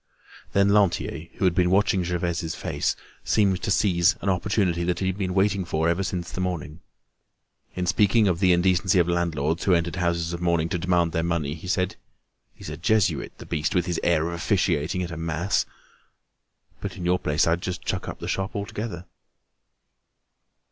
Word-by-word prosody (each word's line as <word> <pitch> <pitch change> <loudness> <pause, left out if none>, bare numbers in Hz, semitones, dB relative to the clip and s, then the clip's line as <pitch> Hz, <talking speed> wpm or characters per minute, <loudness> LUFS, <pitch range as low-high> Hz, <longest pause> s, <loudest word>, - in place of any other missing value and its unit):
Then 100 0 +4
Lantier, 95 -5 +1
who - - -1
had 90 - +4
been 90 -1 +2
watching 95 -1 +3
Gervaise's 85 -1 -2
face, - - -1 0.3
seemed 100 -4 +2
to - - -2
seize 90 -4 +3
an 100 - -1
opportunity 90 -2 +1
that 90 0 0
he 95 - -2
had 95 -1 0
been 95 -2 -2
waiting 100 0 +2
for 80 -2 0
ever 85 +3 +1
since 90 -2 -3
the 90 - -4
morning. 85 -4 -4 1.0
In 90 - -1
speaking 100 +4 +3
of 90 -3 +1
the 95 -2 +4
indecency 90 +1 +3
of 85 -1 +4
landlords 85 -2 0
who 95 - +5
entered 85 0 -1
houses 85 -1 0
of 85 - -5
mourning 85 -2 +1
to 85 - -1
demand 85 -1 +1
their 80 -1 0
money, 85 -4 -1
he 80 +3 -9
said: 95 -1 0 0.5
"He's - - -9
a - - -6
Jesuit, 110 -3 +1
the - - -10
beast, 75 0 -2
with 90 -2 +2
his 90 -2 -1
air 85 -2 +2
of - - -5
officiating 90 -1 0
at 85 - -5
a 85 - -6
mass! 85 +4 0 1.1
But - - -6
in 90 - -5
your 90 +1 +2
place, 75 0 +1
I'd 85 +1 +1
just 90 -1 -4
chuck - - -2
up - - -6
the - - -7
shop 95 +4 -2
altogether." 100 -3 -5
90 Hz, 190 wpm, -25 LUFS, 85-95 Hz, 1.1 s, who